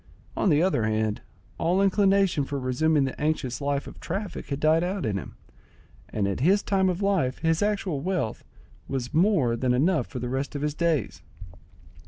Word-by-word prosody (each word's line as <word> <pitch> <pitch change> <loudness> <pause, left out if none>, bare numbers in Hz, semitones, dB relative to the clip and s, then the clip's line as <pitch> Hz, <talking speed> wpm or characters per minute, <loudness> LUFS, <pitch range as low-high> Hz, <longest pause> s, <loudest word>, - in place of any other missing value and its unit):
On - - +2
the 155 0 +4
other 180 -12 +1
hand, 110 -1 -1 0.4
all 175 +3 +2
inclination 195 -4 +3
for 140 +1 -4
resuming 145 +4 +2
the 135 - -5
anxious 150 -4 -1
life 140 0 -1
of - - -11
traffic 195 +2 -5
had 140 -1 -3
died 160 +2 +3
out 185 -1 -2
in 105 -3 -1
him, 100 - -6 0.7
and 100 -2 -1
at 100 - -2
his 190 +9 +3
time 190 -2 +2
of 180 +2 -2
life 180 -11 +1
his 165 0 +1
actual 200 -8 -1
wealth 180 - -2 0.4
was 130 -2 -4
more 160 - +3
than 125 +1 +1
enough 160 +7 +2
for 130 - -8
the 125 0 -3
rest 135 +4 -3
of 145 - -3
his 150 -1 0
days. 165 -2 -1
155 Hz, 185 wpm, -26 LUFS, 130-185 Hz, 0.7 s, the